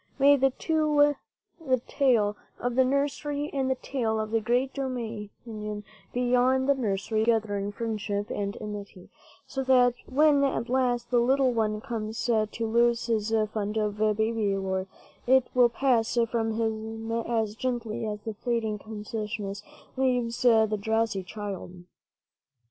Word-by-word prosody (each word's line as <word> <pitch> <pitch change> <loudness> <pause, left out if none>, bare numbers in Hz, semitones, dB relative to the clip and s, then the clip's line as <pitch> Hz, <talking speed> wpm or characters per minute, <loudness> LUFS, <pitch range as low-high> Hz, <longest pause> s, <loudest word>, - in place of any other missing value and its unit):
May 285 +1 +6
the 270 0 +3
two, 300 0 +2 0.5
the 260 -4 +2
tale 230 -7 +2 0.2
of 245 0 -1
the 260 +2 +4
nursery 285 +2 -1
and 265 -2 0
the 260 - +2
tale 230 -5 -2
of 215 0 -3
the 225 0 +2
great 250 +4 +1
dominion 220 -4 -5 0.3
beyond 250 +2 +2
the 280 - +5
nursery, 215 -3 -1
live 225 0 +3
together 205 -2 -4
in 200 +1 -3
friendship 210 -2 -3
and 200 0 -3
amity, 205 -3 -8 0.3
so 270 - -3
that, 250 -2 +5
when 290 +1 +4
at 255 -4 0
last 245 -2 0
the 245 - +4
little 260 +1 +3
one 215 -2 0
comes 220 -1 -4
to 220 -3 +2 0.2
lose 235 +1 +2
his 220 -2 0 0.2
fund 210 0 -2
of 210 -1 -1 0.2
baby 220 -2 +1
lore, 190 0 -2 0.4
it 260 0 +5
will 245 -1 +5
pass 240 -2 +1
from 225 -1 0
him 225 0 -3
as 225 -2 -1
gently 235 -2 -3
as 210 -1 -4
the 220 +1 -5
fleeing 220 -1 -2
consciousness 210 -1 -5 0.3
leaves 250 -3 0
the 220 -3 +4
drowsy 220 -2 0
child 185 -2 -7
230 Hz, 145 wpm, -27 LUFS, 215-255 Hz, 0.5 s, May